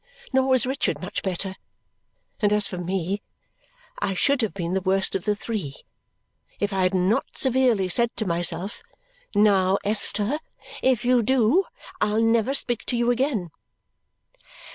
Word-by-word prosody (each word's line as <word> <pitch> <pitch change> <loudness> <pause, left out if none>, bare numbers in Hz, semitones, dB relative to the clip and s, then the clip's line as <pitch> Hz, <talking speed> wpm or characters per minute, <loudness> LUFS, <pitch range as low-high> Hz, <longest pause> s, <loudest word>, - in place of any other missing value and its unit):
Nor 265 0 +3
was 260 -2 +3
Richard 265 +2 -1
much 185 - -4
better; 190 0 -3 0.8
and 205 -1 +2
as 210 0 +2
for 180 - -5
me, 185 +2 -2 0.8
I 195 - -1
should 275 +7 +2
have 220 - 0
been 175 -2 -3
the 190 - 0
worst 190 +1 +1
of 190 - -2
the 210 - +1
three 200 -10 -4 0.8
if 205 0 -1
I 190 - 0
had 185 +1 +2
not 185 +4 0
severely 250 -7 +3
said 235 +6 +2
to 220 - -2
myself, 175 +2 -1 0.5
"Now 195 -2 +4
Esther, 210 +5 +1 0.4
if 255 -3 +2
you 250 -1 +4
do, 260 - +3 0.4
I'll 210 +1 +2
never 225 +3 +2
speak 240 -4 -1
to 245 - -1
you 240 +1 +2
again!" 240 - -1
210 Hz, 150 wpm, -24 LUFS, 190-240 Hz, 0.8 s, Now